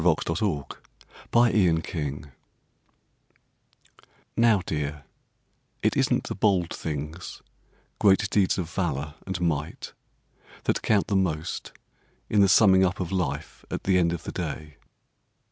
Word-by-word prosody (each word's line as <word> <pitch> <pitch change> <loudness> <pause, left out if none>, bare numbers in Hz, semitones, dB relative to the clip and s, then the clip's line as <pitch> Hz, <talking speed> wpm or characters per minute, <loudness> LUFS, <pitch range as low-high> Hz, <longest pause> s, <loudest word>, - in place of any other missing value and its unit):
THE 85 -2 +5
THINGS 80 -3 -2 0.6
THAT 105 -9 +4
COUNT 70 -4 -4 2.1
NOW, 115 -4 +4
dear, 75 -1 -3 0.8
it - - +2
isn't - - +2
the - - -4
bold 95 -5 +1
things, 75 +3 -6 0.6
Great 100 0 +4
deeds 100 -3 +2
of 90 -4 -2
valour 75 -5 -2
and 95 -2 -3
might, 80 -3 -2 0.7
That - - 0
count 105 -3 +2
the 100 - -1
most 80 -5 -1 0.6
in 105 - +4
the 100 - +5
summing 95 -1 +6
up 95 +2 0
of 90 -2 -3
life 90 -7 -3
at - - -4
the 95 -1 +3
end 85 -1 +2
of 85 -2 -4
the - - -5
day. 75 -1 -5
90 Hz, 130 wpm, -26 LUFS, 75-95 Hz, 2.1 s, summing